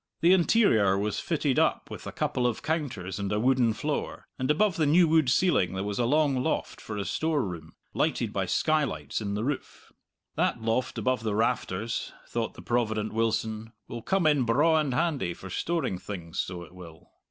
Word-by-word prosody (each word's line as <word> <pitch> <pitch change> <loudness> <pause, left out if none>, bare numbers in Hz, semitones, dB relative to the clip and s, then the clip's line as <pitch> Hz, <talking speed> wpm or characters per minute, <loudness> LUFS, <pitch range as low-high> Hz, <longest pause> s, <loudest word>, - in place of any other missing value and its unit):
The 175 +3 +6
interior 165 - +4
was 105 +1 -1
fitted - - 0
up - - +1
with - - -7
a - - -4
couple 125 -1 0
of 120 - -3
counters 125 - -3
and 100 0 -2
a 105 - +1
wooden 125 -1 +3
floor; 145 +7 -3
and 130 +1 -1
above 190 +5 +3
the 155 -3 +1
new 170 +4 +5
wood 155 -4 +3
ceiling 125 - +2
there 95 - -2
was 100 +1 -3
a 120 - +2
long 140 0 +2
loft 160 - -2
for 105 - -6
a 100 - -2
storeroom, 135 - -2 0.2
lighted - - 0
by - - -1
skylights 155 -6 0
in 100 -1 -2
the 105 - -2
roof. 140 +2 -5 0.4
That - - 0
loft 115 +3 -1
above 130 -2 0
the 110 -2 -1
rafters, 115 -1 -1
thought - - -3
the - - -11
provident 110 -3 -1
Wilson, 110 0 -1
will 120 - -6
come 190 - +1
in 150 -3 +4
braw 150 +8 +3
and 150 -3 0
handy 135 - 0
for 95 - -10
storing 160 - -1
things, 90 -4 -7
so 90 -1 -3
it 85 - -14
will. 85 -3 -13
120 Hz, 190 wpm, -28 LUFS, 105-150 Hz, 0.4 s, The